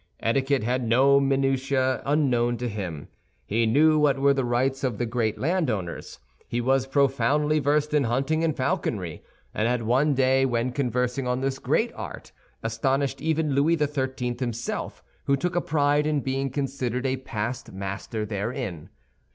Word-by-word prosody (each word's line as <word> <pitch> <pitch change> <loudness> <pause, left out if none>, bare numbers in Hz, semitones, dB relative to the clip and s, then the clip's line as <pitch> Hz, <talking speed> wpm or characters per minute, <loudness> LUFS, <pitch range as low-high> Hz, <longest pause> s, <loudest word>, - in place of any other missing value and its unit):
Etiquette 135 +2 +1
had 125 +2 0
no 135 +4 +5
minutiæ 135 -1 +1
unknown 125 -5 +2
to 125 +1 -3
him. 95 -9 -5 0.4
He 115 +2 +1
knew 155 +6 +4
what 145 -2 +3
were 140 +1 +4
the 135 -1 0
rights 130 +3 0
of 125 -5 -1
the 120 - -1
great 115 -2 -1
land 165 0 0
owners. 95 -6 -4 0.3
He 120 - -2
was 130 +2 +1
profoundly 145 +2 +2
versed 150 +1 +1
in 145 -3 +3
hunting 135 +7 0
and 160 -2 0
falconry, 105 - -2 0.3
and 110 - 0
had 120 -1 0
one 135 +6 +2
day 130 0 +3
when 120 -1 0
conversing 125 0 -1
on 125 +1 0
this 135 0 -1
great - - 0
art - - -8 0.3
astonished 130 +5 -1
even 160 -1 0
Louis 150 +5 +3
XIII. 130 -4 -1
himself, 120 -2 -4 0.2
who 140 - +2
took 175 +5 -2
a 175 - +2
pride 145 -1 +2
in 150 -2 +1
being 135 +1 -1
considered 130 -2 -2
a 130 0 0
past 120 -1 -4
master 100 +3 -4
therein. 105 - -4
130 Hz, 160 wpm, -25 LUFS, 120-140 Hz, 0.4 s, no